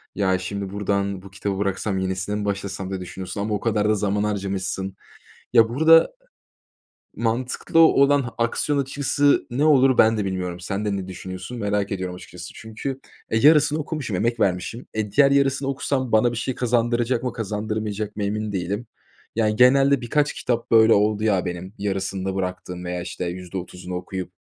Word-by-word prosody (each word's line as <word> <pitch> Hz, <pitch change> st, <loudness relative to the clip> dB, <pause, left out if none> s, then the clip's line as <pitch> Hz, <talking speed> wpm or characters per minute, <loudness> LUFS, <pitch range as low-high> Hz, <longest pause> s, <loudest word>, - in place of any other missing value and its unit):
ya, 95 Hz, -2 st, +2 dB
şimdi 100 Hz, +1 st, -4 dB
buradan 100 Hz, -1 st, -1 dB
bu 95 Hz, 0 st, -13 dB
kitabı 100 Hz, 0 st, -3 dB
bıraksam 100 Hz, 0 st, -1 dB
yenisine 95 Hz, +2 st, -2 dB
mi 105 Hz, 0 st, -3 dB
başlasam 100 Hz, -1 st, -3 dB
diye 95 Hz, -1 st, -4 dB
düşünüyorsun 90 Hz, +2 st, -6 dB
ama 105 Hz, +1 st, -2 dB
o 105 Hz, -, 0 dB
kadar 105 Hz, -1 st, +1 dB
da 110 Hz, -, +3 dB
zaman 105 Hz, 0 st, 0 dB
harcamışsın. 95 Hz, -2 st, -3 dB, 0.6 s
Ya, 115 Hz, -2 st, +6 dB
burada 160 Hz, +6 st, +5 dB, 1.1 s
mantıklı 120 Hz, +7 st, 0 dB
olan 140 Hz, -5 st, +5 dB
aksiyon 130 Hz, +5 st, 0 dB
açıkçası 145 Hz, +1 st, +1 dB
ne 135 Hz, +5 st, 0 dB
olur, 135 Hz, -4 st, +5 dB
ben 110 Hz, 0 st, +5 dB
de 105 Hz, -, -1 dB
bilmiyorum. 90 Hz, -2 st, -3 dB
Sen 100 Hz, +4 st, -3 dB
de 105 Hz, -1 st, 0 dB
ne 95 Hz, -1 st, -5 dB
düşünüyorsun, 95 Hz, +5 st, -7 dB
merak 105 Hz, -1 st, -1 dB
ediyorum 95 Hz, -2 st, -3 dB
açıkçası. 90 Hz, -1 st, -10 dB
Çünkü, 115 Hz, +5 st, -6 dB, 0.3 s
e, 110 Hz, -, +1 dB
yarısını 150 Hz, +3 st, +5 dB
okumuşum, 150 Hz, -, -3 dB
emek 115 Hz, +5 st, 0 dB
vermişim. 95 Hz, +3 st, -1 dB
E, 110 Hz, -2 st, -2 dB
diğer 140 Hz, +5 st, +5 dB
yarısını 135 Hz, -1 st, +2 dB
okusam 135 Hz, -2 st, -1 dB
bana 110 Hz, +2 st, +4 dB
bir 120 Hz, -, -5 dB
şey 125 Hz, +2 st, -2 dB
kazandıracak 120 Hz, 0 st, +1 dB
mı, 125 Hz, -2 st, -2 dB
kazandırmayacak 105 Hz, -1 st, -3 dB
mı, 105 Hz, -, -3 dB
emin 105 Hz, +1 st, -2 dB
değilim. 100 Hz, +5 st, -3 dB, 0.5 s
Yani, 110 Hz, -1 st, +1 dB
genelde 135 Hz, +3 st, +5 dB
birkaç 145 Hz, +5 st, +1 dB
kitap 120 Hz, -2 st, -2 dB
böyle 110 Hz, 0 st, +7 dB
oldu, 105 Hz, +1 st, +2 dB
ya, 100 Hz, -4 st, +2 dB
benim, 90 Hz, +2 st, -5 dB
yarısında 95 Hz, -1 st, -2 dB
bıraktığım 90 Hz, -1 st, -4 dB
veya, 90 Hz, 0 st, -3 dB
işte, 90 Hz, +1 st, -5 dB
%30'unu 90 Hz, 0 st, -6 dB
okuyup 90 Hz, 0 st, -5 dB
105 Hz, 165 wpm, -23 LUFS, 95-120 Hz, 1.1 s, böyle